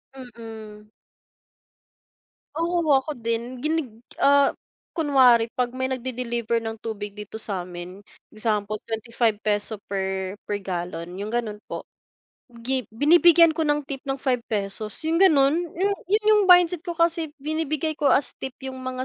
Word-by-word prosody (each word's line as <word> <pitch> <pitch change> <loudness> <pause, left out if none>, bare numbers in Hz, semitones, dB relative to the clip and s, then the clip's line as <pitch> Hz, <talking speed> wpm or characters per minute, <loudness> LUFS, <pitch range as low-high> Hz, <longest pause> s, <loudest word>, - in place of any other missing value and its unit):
Mm. 225 -4 -10 1.7
Oo, 335 -2 +1
ako 270 +3 +2
din. 235 +2 -2
Ginig 315 -3 0 0.3
ah, 280 0 +5 0.4
kunwari 255 -7 +4
'pag 250 0 0
may 260 0 -2
nag-de-deliver 240 -2 -2
ng 225 0 -5
tubig 210 -2 -6
dito 210 +1 -8
sa'min, 180 0 -6 0.2
example 215 -1 -2
₱25 220 -2 -1
per, 190 0 -3
per 205 - -2
gallon, 175 -1 -5
yung 210 +3 -5
gano'n 225 -3 -2
po. - - -6 0.8
Gi 260 -2 +1
binibigyan 330 +6 +6
ko 320 - -1
ng 295 -1 +1
tip 275 -2 -5
ng 270 - 0
₱5, 215 -5 -3
yung 330 +3 +1
gano'n, 305 -3 +5 0.2
Yu 385 +3 +1 0.2
yun 420 +2 +2
yung 420 - +5
mindset 355 -1 +6
ko, 345 0 -6
kasi 335 -1 +1
binibigay 310 +1 -2
ko 295 -2 +1
as 275 - +3
tip 265 -1 -5
yung 260 -1 -6
mga 255 0 -4
245 Hz, 135 wpm, -24 LUFS, 215-295 Hz, 1.7 s, binibigyan